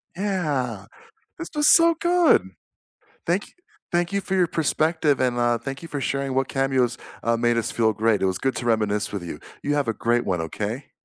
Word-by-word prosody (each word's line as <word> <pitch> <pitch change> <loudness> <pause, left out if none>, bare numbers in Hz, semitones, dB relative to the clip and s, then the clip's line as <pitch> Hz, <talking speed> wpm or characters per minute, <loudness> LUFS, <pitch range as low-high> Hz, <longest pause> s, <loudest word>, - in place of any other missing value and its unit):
Yeah, 145 - -2 0.5
this 335 - -6
was 295 0 +3
so 335 -1 +6
good. 345 -1 +4 0.8
Thank 180 +4 +1
y - - -13 0.4
thank 175 +1 0
you 200 - +1
for 190 - -2
your 180 -2 +3
perspective, 160 -2 +1
and, 125 -2 +1
uh, 120 0 +2
thank 135 +5 -6
you 165 - -8
for 145 - -4
sharing 135 -1 -2
what 135 0 +1
cameos, 130 -3 +1 0.3
uh, 115 0 +2
made 120 0 +1
us 115 -1 -1
feel 110 -1 +2
great. 110 0 +1
It - - +2
was 95 -1 0
good 135 0 -1
to 120 - -5
reminisce 105 -2 0
with 100 -3 -4
you. 85 - -7 0.2
You 145 - 0
have 145 -4 0
a 115 - 0
great 120 +3 0
one, 90 -3 0
okay? 105 - -5
130 Hz, 205 wpm, -24 LUFS, 115-165 Hz, 0.8 s, so